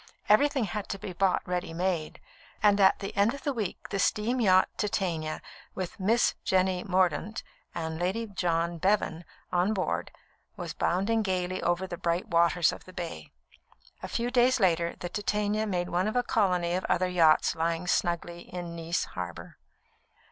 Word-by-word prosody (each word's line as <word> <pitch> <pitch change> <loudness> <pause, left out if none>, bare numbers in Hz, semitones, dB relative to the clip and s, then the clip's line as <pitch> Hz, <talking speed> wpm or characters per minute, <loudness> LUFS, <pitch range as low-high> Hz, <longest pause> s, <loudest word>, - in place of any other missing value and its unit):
Everything 275 +4 +4
had 210 -1 -4
to 195 - -3
be 195 -2 -7
bought 190 +1 +1
ready 180 -2 -2
made; 175 -3 -2 0.4
and 205 -1 +5
at 190 - +6
the 195 - -6
end 205 +6 +3
of 280 - -11
the 285 - 0
week 215 -7 -4
the 195 - -2
steam 230 +6 +1
yacht 185 -3 +5
Titania, 170 -7 -2 0.3
with 185 0 -5
"Miss 225 +5 +3
Jenny 185 -1 +1
Mordaunt" 190 +3 0 0.3
and 160 -1 -3
Lady 190 +6 -1
John 170 -4 -1
Bevan 180 -3 +1 0.3
on 180 +5 +2
board, 90 - -1 0.5
was - - -5
bounding 200 +6 +1
gaily 185 -2 -1
over 175 +2 0
the 175 -2 -6
bright 170 0 -1
waters 170 -1 +3
of - - -10
the 185 - -13
Bay. 170 - -6 0.7
A - - -5
few 240 +1 -2
days 250 0 +4
later, 170 -4 +2
the 175 - -5
Titania 210 +1 -1
made 180 -3 -1
one 180 +3 +1
of 215 - -2
a 245 - +3
colony 180 -7 +1
of 185 - -1
other 185 - +1
yachts 165 -4 +4
lying 165 +1 -1
snugly 175 -1 -1
in 175 -2 -6
Nice 165 +1 -1
harbour. 90 -1 -7
185 Hz, 170 wpm, -28 LUFS, 170-210 Hz, 0.7 s, at